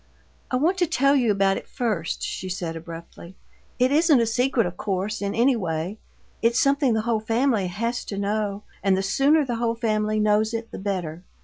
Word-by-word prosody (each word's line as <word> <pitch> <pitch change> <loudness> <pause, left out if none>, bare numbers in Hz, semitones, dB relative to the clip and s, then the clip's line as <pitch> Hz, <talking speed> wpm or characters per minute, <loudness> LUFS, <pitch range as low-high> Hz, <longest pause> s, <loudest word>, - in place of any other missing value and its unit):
"I - - -1
want 335 +9 +1
to 350 - +3
tell 275 0 +3
you 245 -5 +3
about 195 -1 +2
it - - -8
first," 210 -10 -2
she 185 - -4
said, 175 -3 -4
abruptly. 170 +2 -10 0.4
"It 255 +1 +3
isn't 305 -2 +5
a 230 - +3
secret, 245 +1 +1
of 175 0 -4
course, 200 +3 -2
in 200 0 -2
any 250 +3 +4
way; 180 0 -3 0.4
it's 235 +2 +3
something 275 -3 +3
the 220 - +1
whole 230 0 0
family 225 -2 +1
has 230 +7 -2
to 200 - -5
know, 205 0 -2 0.2
and 195 -1 +2
the 190 - -1
sooner 285 +9 +3
the 240 -3 -2
whole 230 0 0
family 215 -2 0
knows 215 +1 +2
it 230 0 -5
the - - -7
better. 180 -4 -3
215 Hz, 200 wpm, -24 LUFS, 195-245 Hz, 0.4 s, isn't